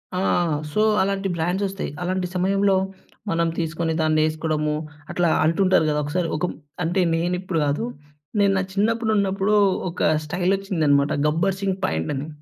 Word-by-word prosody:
ఆ! - - 0 0.5
సో 215 - +2 0.2
అలాంటి 195 0 0
బ్రాండ్స్ 175 +4 -1
ఒస్తాయి. 195 +1 -4
అలాంటి 180 0 -1
సమయంలో 195 +2 +2 0.5
మనం 170 -1 +1
తీసుకొని 165 0 -1
దాన్నేసుకోడము. 155 -1 +1 0.4
అట్లా 175 -1 +1 0.2
అంటుంటారు 185 +1 +3
గదా! 150 0 +1
ఒక్కసారి 165 +4 -1
ఒక 165 - 0 0.4
అంటే, 175 +3 +1
నేను 175 +2 0
ఇప్పుడు 185 -4 -2
గాదు. 145 +10 0 0.6
నేను 200 -1 +4
నా - - 0
చిన్నప్పుడు 220 +3 +1
ఉన్నప్పుడు 200 +1 +1 0.4
ఒక - - -7 0.2
స్టైలొచ్చిందన్నమాట. 175 -4 +1 0.2
'గబ్బర్‌సింగ్' 190 +4 0
ప్యాంటని. 135 - -2
180 Hz, 130 wpm, -23 LUFS, 155-195 Hz, 0.6 s, నేను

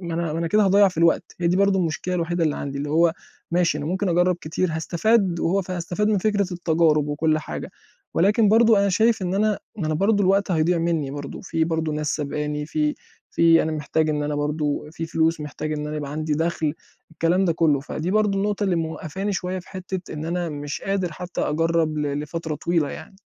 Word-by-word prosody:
ما 170 -2 -4
أنا 165 -2 -1
ما 160 - -2
أنا 165 - -1
كده 210 +4 +3
هاضيّع 200 +1 +5
في 180 -3 -8
الوقت 170 0 +3 0.2
هي 170 - +1
دي 175 +2 +2
برضه 200 0 +3
المشكلة 180 +1 -1
الوحيدة 170 -1 0
اللي 150 - 0
عندي، 140 0 -4
اللي 145 +1 -3
هو 165 +1 +4 0.4
ماشي 170 -3 +2
أنا 145 - -4
ممكن 185 +3 -1
أجرّب 175 +1 +2
كتير 160 +4 -1
هاستفاد 175 +3 +1
وهو 190 +4 +1
فهاستفاد 180 +3 -2
من 210 -2 +2
فكرة 200 -2 0
التجارب 160 -3 +2
وكُلّ 155 +1 +1
حاجة، 155 - -6 0.4
ولكن 210 +4 +4
برضه 225 0 +5
أنا 200 0 +3
شايف 220 +2 +2
إن 180 +1 -1
أنا 210 +1 +1 0.2
ما 170 -7 -2
أنا 155 - 0
برضه 205 +4 +2
الوقت 195 +1 +2
هيضيع 170 +1 +2
منّي 165 -4 0
برضه 145 0 -6
في 165 -4 0
برضه 160 -1 -1
ناس 150 0 -1
سابقاني 150 0 -3
في 150 0 0 0.4
في 165 0 +5
أنا 160 - -2
محتاج 155 +1 0
إن 150 -1 -1
أنا 145 0 -2
برضه 150 0 -1
في 165 0 -5
فلوس 165 0 +1
محتاج 150 +1 -4
إن 150 0 -3
أنا 150 0 -4
يبقى 145 -2 -4
عندي 155 0 -2
دخل، 160 -1 -1 0.4
الكلام 170 +4 +1
ده 170 - +2
كُلّه 155 -4 +2
فدي 155 +5 -4
برضه 210 -1 +2
النقطة 205 +1 0
اللي 185 -3 +1
موقّفاني 165 +4 -3
شوية 185 0 -2
في 180 - -12
حتّة 185 -1 -6
إن 155 0 -5
أنا 175 0 -2
مش 145 -1 -5
قادر 190 -4 -1
حتّى 180 +2 -5
أجرّب 160 0 +1
ل 145 -1 -1
لفترة 160 +1 -4
طويلة 165 -1 0
يعني. 190 - -10
165 Hz, 215 wpm, -23 LUFS, 155-185 Hz, 0.4 s, هاضيّع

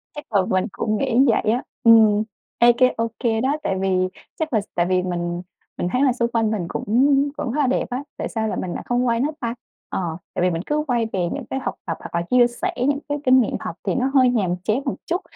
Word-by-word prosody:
Chắc 295 -6 -10
là 200 - +5
mình 185 0 +2
cũng 215 -1 -1
nghĩ 235 +4 +1
vậy 220 -2 +2
á. 245 - -1 0.2
Ừm, 220 -2 +6 0.4
ê 240 0 +7
cái 255 -1 +4
ô 230 0 +1 0.2
kê 225 -1 +1
đó, 275 +4 +1
tại 195 - 0
vì 185 -1 +1 0.3
chắc 315 -3 -2
là 215 - +3
s - - -14
tại 175 0 +2
vì 185 0 +2
mình, 175 -1 -3 0.4
mình 175 - -1
thấy 255 +6 +2
là 260 -3 +4
xung 235 -1 0
quanh 225 -2 +1
mình 205 -6 -2
cũng - - -4 0.5
cũng 285 -6 -3
khá 300 - -1
là 270 - +2
đẹp 255 - +1
á. 250 +3 -3
Tại - - -3
sao 220 -2 -2
là - - -2
mình 180 - -3
lại - - -5
không 245 +1 +1
quay 230 0 +1
nó 290 +4 +1
ta? 235 -1 -3 0.3
Ờ, 170 -4 -3 0.2
tại - - -2
vì 180 - +3
mình 165 -1 -2
cứ 300 0 0
quay 240 -2 +1
về 190 - -1
những 275 -4 -5
cái 265 - -2
học - - -4
tập 165 - -3
hoặc - - -8
là 170 - +1
chia 245 -1 +6
sẻ 340 +10 -3
những 280 +3 +1
cái 290 - 0
kinh 255 0 +6
nghiệm - - -1
học - - -5
thì - - -1
nó 265 +1 0
hơi 260 -3 +5
nhàm 195 -8 +1
chán 220 +7 +1
một 270 - -1
chút, 355 +3 -1
235 Hz, 270 wpm, -22 LUFS, 195-260 Hz, 0.5 s, ê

